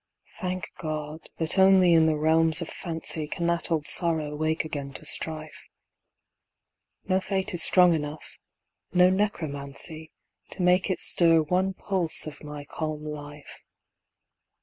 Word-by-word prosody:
Thank 185 -2 -4
God, 155 0 -7
that 165 +3 -1
only 190 -2 +5
in 160 -1 +4
the 155 -1 0
realms 160 +1 +1
of 170 - -6
fancy 160 -2 -2
Can 170 +3 -5
that 170 0 -1
old 160 -3 -2
sorrow 155 -4 +2
wake 155 +1 -2
again 145 -3 -7
to 155 - -8
strife. 155 0 -1 1.4
No 185 0 +1
fate 190 +1 -4
is 175 - +5
strong 180 -2 +5
enough 150 -1 -6 0.5
no 180 0 +4
necromancy 160 -5 -4 0.4
To 180 - -5
make 180 +2 +2
it 185 - -1
stir 165 -2 +6
one 185 +4 -1
pulse 185 -5 +1
of 155 0 -10
my 150 -1 -9
calm 155 0 -6
life. 145 -1 -10
160 Hz, 140 wpm, -25 LUFS, 150-180 Hz, 1.4 s, stir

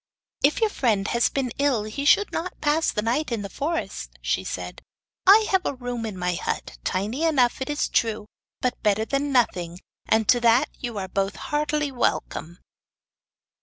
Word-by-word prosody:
'If 290 - +3
your 440 -2 +3
friend 215 - +1
has 235 0 +2
been 265 -3 -2
ill 275 -7 +2
he 220 +7 -4
should 410 +7 +4
not 355 +2 -4
pass 310 +2 +2
the 210 - -1
night 250 +6 0
in 225 -3 -2
the 200 - -6
forest,' 330 +4 -4
said - - -3
she. - - -38 0.5
'I 430 +2 +7
have 360 -9 0
room 245 -2 -3
in 205 -4 -6
my 180 0 -1
hut 60 - -4
tiny 215 - -1
enough, 265 -7 +2
it 265 - -3
is 295 0 0
true; 220 -2 0 0.4
but 250 -1 -1
better 215 0 +2
than 280 +3 -1
nothing, 180 -9 +1 0.3
and 220 -1 +2
to 245 - +5
that 235 +1 +4
you 240 -4 -5
are 190 -1 -3
both 195 +1 -1
heartily 300 -1 -1
welcome. 175 -8 -2
245 Hz, 175 wpm, -24 LUFS, 210-290 Hz, 0.5 s, I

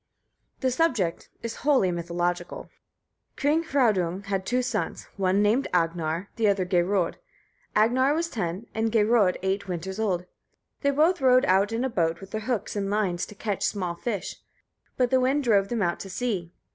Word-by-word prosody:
The 260 -1 +1
subject 240 - 0
is 230 -1 -4
wholly 265 -11 +3
mythological. 175 +1 -3 0.6
King 300 +3 +2
Hraudung 200 - +1
had 195 -1 -3
two 250 +1 +1
sons, 250 - -3
one 195 +1 +2
named 225 +6 +2
Agnar, 165 +1 0
the 225 -2 +2
other 195 -2 +2
Geirröd. 180 0 +1 0.6
Agnar 255 +6 +3
was 335 +1 0
ten, 195 - -4
and 225 0 0
Geirröd 215 -3 +3
eight 195 +1 -1
winters 190 +3 -4
old. 185 -5 0 0.6
They 280 - +2
both 310 +4 +3
rowed 255 -1 +5
out 195 +3 +3
in 230 +2 -1
a - - +1
boat, 170 -6 0
with 195 0 -11
their 220 - -3
hooks 235 -2 -2
and 200 -1 -1
lines, 195 -4 0
to 210 - -12
catch 205 -1 -3
small 180 -4 -1
fish; 200 +2 -4 0.6
but 250 -1 +2
the 260 - +4
wind 270 +3 +2
drove 205 -5 +3
them 230 -1 -1
out 175 -1 0
to 195 - -7
sea. 190 -5 -2
205 Hz, 170 wpm, -26 LUFS, 180-245 Hz, 0.6 s, rowed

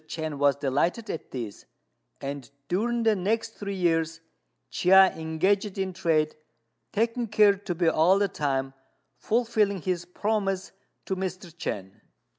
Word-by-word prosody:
Chên 155 -3 -4
was 140 -1 +4
delighted 150 - 0
at 160 - -6
this; 115 -6 -6 0.5
and 140 -3 -6 0.2
during 230 +8 0
the 220 -1 +4
next 220 +4 0
three 200 -2 -5
years 165 -3 +1 0.5
Chia 190 +1 +6
engaged 185 +6 0
in 190 -1 -2
trade, 155 -3 +1 0.6
taking 230 +2 0
care 210 -1 +5
to 195 -2 -5
be 170 0 +1
all 165 +4 +4
the 200 0 +2
time 135 -6 -2 0.5
fulfilling 215 - +1
his 180 -2 -1
promise 195 -1 -1 0.3
to 190 - -2
Mr. 185 -2 -5
Chên. 95 - -5
185 Hz, 135 wpm, -27 LUFS, 160-205 Hz, 0.6 s, Chia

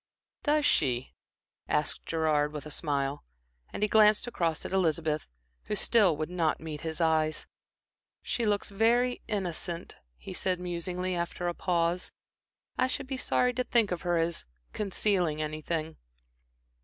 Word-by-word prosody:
"Does 300 0 +2
she?" 125 - +2 0.5
asked 150 0 -1
Gerard 155 -2 +1
with 150 -1 -6
a 150 - -7
smile, 140 -2 -1 0.5
and - - -3
he - - +4
glanced 210 0 +5
across 170 -9 -1
at - - -5
Elizabeth, 160 -4 +1 0.4
who - - -2
still 205 -9 +4
would 155 0 -2
not 165 -3 +1
meet 155 -2 -6
his 160 -1 -4
eyes. 160 -2 +2 0.8
"She 240 - -1
looks 205 -2 +1
very 235 +4 +2
innocent," 175 -4 -3 0.2
he - - -8
said, 185 -1 -1
musingly, 180 +1 -3
after 175 0 -2
a 175 - 0
pause. 175 0 0 0.7
"I 255 - +4
should 265 +1 -2
be 265 0 -3
sorry 250 -1 +2
to 250 +1 0
think 230 -5 +2
of 180 - -2
her 175 -2 +1
as 165 +1 0 0.3
concealing 190 -6 0
anything." 155 +1 -3
170 Hz, 145 wpm, -29 LUFS, 155-205 Hz, 0.8 s, glanced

